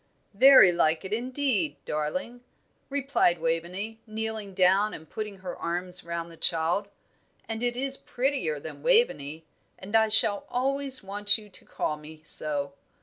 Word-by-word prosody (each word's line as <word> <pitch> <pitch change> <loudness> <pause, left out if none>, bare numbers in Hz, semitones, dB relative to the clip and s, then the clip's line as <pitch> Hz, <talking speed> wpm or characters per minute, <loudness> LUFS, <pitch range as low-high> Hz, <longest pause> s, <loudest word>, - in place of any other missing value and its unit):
"Very 255 -4 +8
like 165 0 +1
it, 190 - -4
indeed, 250 - -1
darling," 185 +11 -3 0.5
replied 275 -10 +1
Waveney, 175 +7 -3
kneeling 220 -2 -5
down 190 +3 +3
and 160 - -12
putting 210 +3 -6
her 185 -1 -7
arms 180 +1 -2
round 170 0 -5
the 165 - -14
child; 170 +5 0 0.6
"and 225 0 -4
it 245 0 -1
is 270 +1 0
prettier 275 - -2
than - - -9
Waveney, 165 - +1 0.3
and 200 +4 -6
I 220 0 +4
shall 210 -1 +3
always 270 0 +2
want 205 +2 +1
you 210 -1 -13
to 185 - -14
call 150 - -3
me 155 +1 -13
so. 145 -2 -1
200 Hz, 145 wpm, -27 LUFS, 170-245 Hz, 0.6 s, Very